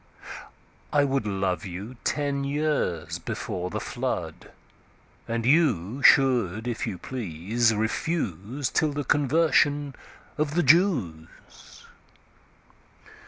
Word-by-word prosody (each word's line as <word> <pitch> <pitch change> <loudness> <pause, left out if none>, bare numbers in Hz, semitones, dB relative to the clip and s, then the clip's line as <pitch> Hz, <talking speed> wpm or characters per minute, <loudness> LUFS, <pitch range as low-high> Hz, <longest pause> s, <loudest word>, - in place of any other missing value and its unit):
I 145 - +3
wouldLove 100 - -1
you 100 +6 -7
ten 140 -1 -1
years 145 - -1
before 90 0 -4
the - - -3
Flood:And 115 0 -6
you 130 - +2
should 120 -7 +4
if 120 -2 -3
you 95 - -4
please 110 +1 -1
refuseTill 120 - -1
the 145 - -2
Conversion 145 0 +2 0.5
of 150 0 -1
the 175 - +3
Jews. 130 - 0
125 Hz, 85 wpm, -26 LUFS, 100-145 Hz, 0.5 s, should